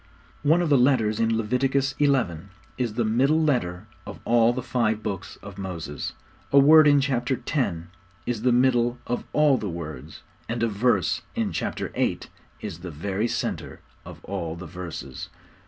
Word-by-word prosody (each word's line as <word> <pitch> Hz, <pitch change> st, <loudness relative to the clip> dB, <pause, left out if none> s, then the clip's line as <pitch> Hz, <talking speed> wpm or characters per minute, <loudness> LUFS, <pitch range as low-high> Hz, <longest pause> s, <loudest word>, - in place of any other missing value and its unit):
One 160 Hz, +4 st, +3 dB
of 170 Hz, -, -1 dB
the 140 Hz, -3 st, +5 dB
letters 120 Hz, -5 st, +3 dB
in 115 Hz, 0 st, +2 dB
Leviticus 130 Hz, +4 st, +1 dB
xi. 145 Hz, -1 st, +4 dB, 0.7 s
is 120 Hz, -4 st, -2 dB
the 120 Hz, -1 st, +1 dB
middle 135 Hz, +8 st, +3 dB
letter 120 Hz, -, 0 dB, 0.2 s
of -, -, -8 dB
all 115 Hz, 0 st, +4 dB
the 125 Hz, 0 st, -4 dB
five 115 Hz, -3 st, 0 dB
Books 100 Hz, -1 st, -5 dB
of 100 Hz, -1 st, -10 dB
Moses, 85 Hz, -6 st, -5 dB, 0.4 s
a 140 Hz, -, +4 dB
word 155 Hz, +2 st, +8 dB
in 145 Hz, -1 st, +6 dB
chapter 130 Hz, -2 st, 0 dB
x. 125 Hz, -, 0 dB, 0.5 s
is 120 Hz, -3 st, -2 dB
the 125 Hz, +1 st, +3 dB
middle 120 Hz, -1 st, +3 dB
of 120 Hz, -, -3 dB
all 150 Hz, -3 st, +4 dB
the 105 Hz, -, -3 dB
words, 80 Hz, -4 st, -8 dB, 0.3 s
and 115 Hz, 0 st, -1 dB
a -, -, +3 dB
verse 105 Hz, -3 st, +1 dB
in -, -, -1 dB
chapter -, -, -3 dB
viii. -, -, -1 dB, 0.4 s
is 80 Hz, -, -6 dB
the 90 Hz, 0 st, -7 dB
very 95 Hz, +8 st, -2 dB
centre -, -, -3 dB, 0.2 s
of -, -, -12 dB
all 85 Hz, -4 st, -4 dB
the 85 Hz, +2 st, -8 dB
verses. 90 Hz, 0 st, -7 dB
115 Hz, 170 wpm, -25 LUFS, 95-130 Hz, 0.7 s, word